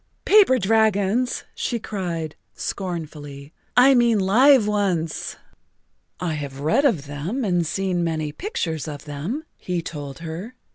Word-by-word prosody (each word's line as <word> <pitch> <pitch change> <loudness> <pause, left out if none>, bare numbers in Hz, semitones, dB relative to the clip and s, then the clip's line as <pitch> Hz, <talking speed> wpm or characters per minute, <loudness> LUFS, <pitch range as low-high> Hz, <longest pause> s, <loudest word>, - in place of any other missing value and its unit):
"Paper 395 -11 +6
dragons," 220 +2 +2
she 240 - -2
cried 175 -8 -4 0.2
scornfully. 150 -5 -5 0.2
"I 265 +2 +8
mean 235 -3 +4
live 230 +6 +5
ones." 190 -6 -1 0.8
"I 175 -3 -1
have 140 -3 -5
read 225 - +2
of 180 - +2
them 160 - -3
and 175 -4 +1
seen 185 0 -1
many 155 -2 -1
pictures 160 - -3
of 150 -1 -7
them," 155 - -4
he 175 -2 -3
told 145 -4 -6
her. 180 +10 -6
180 Hz, 130 wpm, -23 LUFS, 155-225 Hz, 0.8 s, I